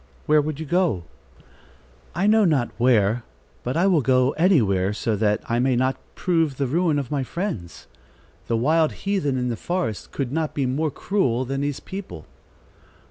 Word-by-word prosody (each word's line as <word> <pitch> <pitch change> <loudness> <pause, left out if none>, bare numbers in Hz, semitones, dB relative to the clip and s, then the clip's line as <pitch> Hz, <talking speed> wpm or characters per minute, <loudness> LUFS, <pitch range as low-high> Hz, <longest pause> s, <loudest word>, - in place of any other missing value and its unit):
"Where 150 0 +4
would 150 0 -4
you 160 - -4
go?" 170 - +1 1.1
"I 180 +4 0
know 215 +1 +5
not 145 -10 +2
where; 115 -2 +3 0.4
but 125 +5 -2
I 175 - +3
will 180 -6 +4
go 130 0 +3
anywhere, 105 - +2
so 110 +1 -1
that 105 0 +1
I 120 +1 0
may 130 0 +2
not 130 +2 +1 0.2
prove 165 -6 0
the 140 - 0
ruin 160 +3 +1
of 140 -2 -3
my 145 -2 0
friends. 130 - -5 0.6
The 115 - +1
wild 155 +6 +2
heathen 185 -10 0
in 125 0 -1
the 120 - -1
forest 125 - -3
could 135 -3 -3
not 160 +1 -2
be 140 - 0
more 145 +5 0
cruel 130 - 0
than 135 +2 -3
these 145 -1 -2
people." 185 - -8
135 Hz, 175 wpm, -23 LUFS, 120-165 Hz, 1.1 s, know